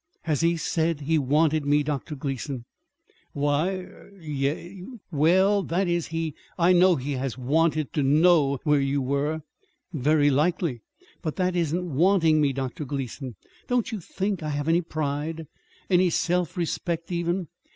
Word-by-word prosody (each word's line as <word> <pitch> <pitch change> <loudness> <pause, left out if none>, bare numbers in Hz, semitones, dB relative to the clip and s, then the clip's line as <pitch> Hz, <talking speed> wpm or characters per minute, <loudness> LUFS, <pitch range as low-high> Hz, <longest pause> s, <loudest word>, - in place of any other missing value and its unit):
"Has 155 -3 0
he 170 0 +2
said 165 -1 -1
he 155 +2 +1
wanted 150 +3 +2
me, 145 +1 +2
Dr. 150 +1 -3
Gleason?" 135 -2 -4 0.7
"Why 145 +5 +1
er 180 - -14
y - - -18
yes; 150 +6 -3 0.3
well, 190 +7 +4
that 185 +1 -1
is, 175 -1 0
he 165 -1 -3 0.2
I 175 +1 +4
know 180 0 +5
he 140 0 -4
has 130 -2 -3
wanted 155 +3 +1
to 150 - +1
know 145 0 +4
where 150 -2 +3
you 135 +1 0
were." 140 +4 -1 0.5
"Very 145 0 +3
likely; 150 -3 0 0.4
but 155 -4 -3
that 185 -1 0
isn't 170 -1 -1
wanting 165 -2 +4
me. 145 -2 +3
Dr. 135 +2 -4
Gleason, 135 -2 -5 0.3
don't 245 -2 0
you 220 - -3
think 190 +2 -3
I 155 - -3
have 145 0 -2
any 165 +2 +3
pride, 155 0 -3 0.4
any 180 -1 +4
self 175 +1 0
respect, 170 0 -2
even? 170 +1 -1
155 Hz, 155 wpm, -25 LUFS, 145-175 Hz, 0.7 s, know